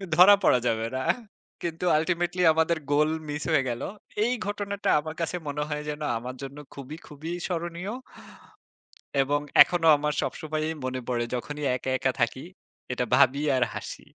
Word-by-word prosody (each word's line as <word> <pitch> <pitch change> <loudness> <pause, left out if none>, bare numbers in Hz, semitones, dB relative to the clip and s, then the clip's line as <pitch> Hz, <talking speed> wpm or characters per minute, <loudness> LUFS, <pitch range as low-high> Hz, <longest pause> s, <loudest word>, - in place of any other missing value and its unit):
ধরা 185 +5 +9
পড়া 125 - +5
যাবে 115 -1 0
না। 130 - -1 0.6
কিন্তু 170 +1 -3
আল্টিমেটলি 175 +2 0
আমাদের 160 +1 +2
গোল 150 +1 +4 0.2
মিস 150 0 -3
হয়ে 150 -4 +4
গেল। 120 -1 -4 0.4
এই 235 - +1
ঘটনাটা 205 0 -2
আমার 155 +1 -6
কাছে 165 +1 -2
মনে 145 +1 -2
হয় 150 0 -3
যেন, 150 +1 -5 0.2
আমার 125 +2 -6
জন্য 135 +1 -8 0.2
খুবই, 140 +3 -8
খুবই 150 +3 -7 0.2
স্মরণীয় 175 +3 -4 1.3
এবং 145 +2 +1 0.2
এখনো 175 -2 0
আমার 150 +1 -1
সবসময়ই 155 0 -3
মনে 130 0 -2
পড়ে 120 -1 0
যখনই 150 +4 -5
একা, 130 +1 -4
একা 130 +1 +1
থাকি। 120 +3 0 0.5
এটা 125 0 -1
ভাবি 135 +3 +4
আর 130 - +3
হাসি। - - -7
150 Hz, 155 wpm, -27 LUFS, 130-170 Hz, 1.3 s, ধরা